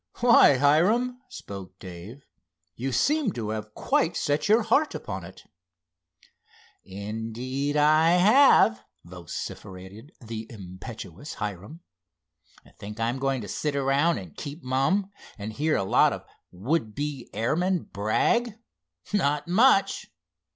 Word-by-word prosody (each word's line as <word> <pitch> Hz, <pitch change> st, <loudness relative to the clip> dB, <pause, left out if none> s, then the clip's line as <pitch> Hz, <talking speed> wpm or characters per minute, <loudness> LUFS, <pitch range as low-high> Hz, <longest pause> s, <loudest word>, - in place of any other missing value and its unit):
"Why, 235 Hz, -, +6 dB
Hiram," 210 Hz, -, +2 dB
spoke 95 Hz, -2 st, -9 dB
Dave, 95 Hz, +10 st, -11 dB, 0.5 s
"you 135 Hz, +3 st, -3 dB
seem 290 Hz, -, +1 dB
to 110 Hz, -3 st, -4 dB
have 110 Hz, -1 st, -5 dB
quite 165 Hz, -, 0 dB
set 145 Hz, +6 st, 0 dB
your 220 Hz, +2 st, +5 dB
heart 300 Hz, +7 st, +2 dB
upon 95 Hz, -3 st, -6 dB
it." 90 Hz, +2 st, -12 dB, 1.4 s
"Indeed 115 Hz, +8 st, -4 dB
I 155 Hz, +3 st, +4 dB
have!" 190 Hz, -, +5 dB, 0.2 s
vociferated 95 Hz, -, -9 dB
the 115 Hz, -2 st, -7 dB
impetuous 100 Hz, -, -9 dB
Hiram. 105 Hz, -, -6 dB, 1.0 s
"Think 105 Hz, +2 st, -8 dB
I'm 120 Hz, +3 st, -1 dB
going 135 Hz, -1 st, -1 dB
to 105 Hz, -, -7 dB
sit 150 Hz, +5 st, -2 dB
around 140 Hz, +4 st, +2 dB
and 90 Hz, -7 st, -9 dB
keep 145 Hz, +4 st, -8 dB
mum, 135 Hz, +11 st, 0 dB, 0.3 s
and 105 Hz, +1 st, -6 dB
hear 155 Hz, +6 st, 0 dB
a -, -, 0 dB
lot 95 Hz, -, +3 dB
of -, -, -8 dB, 0.2 s
would 110 Hz, -, -2 dB
be 145 Hz, -4 st, -4 dB
airmen 170 Hz, -, 0 dB
brag? 210 Hz, -, 0 dB, 0.6 s
Not 150 Hz, -6 st, +1 dB
much! 200 Hz, +3 st, +3 dB
135 Hz, 120 wpm, -26 LUFS, 105-165 Hz, 1.4 s, Why